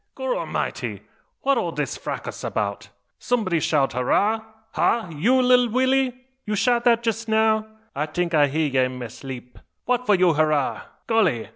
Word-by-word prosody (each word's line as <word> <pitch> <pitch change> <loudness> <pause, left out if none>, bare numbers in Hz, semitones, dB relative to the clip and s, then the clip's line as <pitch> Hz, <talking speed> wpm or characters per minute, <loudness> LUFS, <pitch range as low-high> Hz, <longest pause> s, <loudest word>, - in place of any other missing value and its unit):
"Gorramity! - - -3 0.4
What 275 -2 +3
all 170 - -2
dis 145 -5 -3
fracas - - -6
'bout? 100 +1 -3 0.3
Someb'dy 210 -9 0
shout 145 -4 +1
`Hurrah?' 205 - +1 0.3
Ha! 230 -6 +1
you, 240 - +3
lilly 250 -1 +4
Willy? 255 +1 +1 0.2
you 210 -1 -2
shout 240 +2 +1
dat 235 -1 +4
jess 225 0 -2
now? 220 0 +2 0.3
I 150 +2 -1
tink 175 +2 -2
I 150 -2 +5
hear 155 +3 0
ye 135 -2 0
in 130 0 -3
ma 120 -2 -6
'leep. 125 -2 -8 0.3
What 250 0 0
for 205 - +5
you 180 -2 +4
hurrah? 155 -2 +1 0.2
Golly! 190 - +1
210 Hz, 160 wpm, -23 LUFS, 145-240 Hz, 0.4 s, I